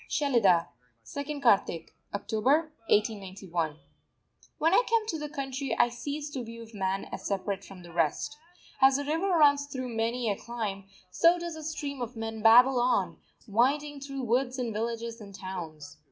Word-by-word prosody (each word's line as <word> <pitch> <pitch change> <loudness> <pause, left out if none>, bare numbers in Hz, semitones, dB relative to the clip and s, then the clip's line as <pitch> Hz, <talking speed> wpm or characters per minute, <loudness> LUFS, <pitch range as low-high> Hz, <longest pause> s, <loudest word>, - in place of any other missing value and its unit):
SHELIDAH, 225 - +3 0.4
2_nd 285 - -5
Kartik_ 195 -8 +3 0.2
(October) 260 +10 +1 0.2
1891. 190 -7 0 0.8
When 325 +3 +2
I 395 - +7
come 455 -1 +3
to 320 - -2
the 300 0 -5
country 270 -1 -3
I 240 - +5
cease 285 +5 -5
to 260 -3 -4
view 230 0 -9
man 195 -1 -1
as - - -6
separate 195 0 -2
from 185 -2 -12
the 170 -1 -12
rest. 170 - 0 0.5
As 265 0 +7
the 285 - -3
river 325 +6 0
runs 290 -5 +4
through 260 -3 -5
many 230 +2 0
a - - -1
clime, 210 -4 -5 0.3
so 335 - +5
does 345 -1 -5
the 315 - -8
stream 290 -3 -4
of 245 +1 -4
men 225 -1 -5
babble 245 +4 +7
on, 250 +1 +1 0.3
winding 280 +7 +1
through 275 -1 -5
woods 250 +2 +1
and 240 -3 -2
villages 230 +1 -3
and 200 -2 -10
towns. 165 -6 -7
240 Hz, 165 wpm, -29 LUFS, 200-285 Hz, 0.8 s, I